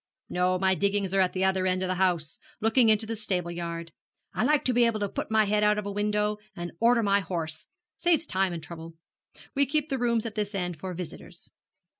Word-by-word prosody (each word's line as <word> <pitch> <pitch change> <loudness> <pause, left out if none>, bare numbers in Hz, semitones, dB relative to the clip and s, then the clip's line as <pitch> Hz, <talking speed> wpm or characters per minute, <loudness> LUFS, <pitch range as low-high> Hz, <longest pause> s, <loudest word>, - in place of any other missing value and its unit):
'No, 180 +1 +1
my 190 0 +3
diggings 200 0 0
are 195 - +3
at 185 -1 +3
the 190 0 +1
other 190 -1 +1
end 185 0 +1
of - - 0
the 185 - 0
house, 175 -4 0 0.2
looking 225 +2 +4
into 215 0 +3
the 225 +1 -3
stable 185 -5 -2
yard. 170 -1 -5 0.4
I - - 0
like 300 -1 +2
to 255 - +3
be 240 0 +4
able 230 -2 +1
to 205 - 0
put - - -5
my 220 -1 +4
head 210 +1 +1
out 210 0 +4
of 210 - -3
window 210 +1 0 0.2
and 175 0 -5
order 235 0 +4
my 200 -1 +3
horse 165 -4 -4 0.3
saves 340 -2 +2
time 190 -6 0
and 165 -2 -6
trouble. 165 0 -9 0.6
We 280 -1 +2
keep 300 +2 0
the 270 - -1
rooms 235 -2 +1
at 225 - -4
this 210 -1 -2
end 180 -4 -3
for 185 +1 -5
visitors.' 180 -1 -9
200 Hz, 225 wpm, -27 LUFS, 180-220 Hz, 0.6 s, looking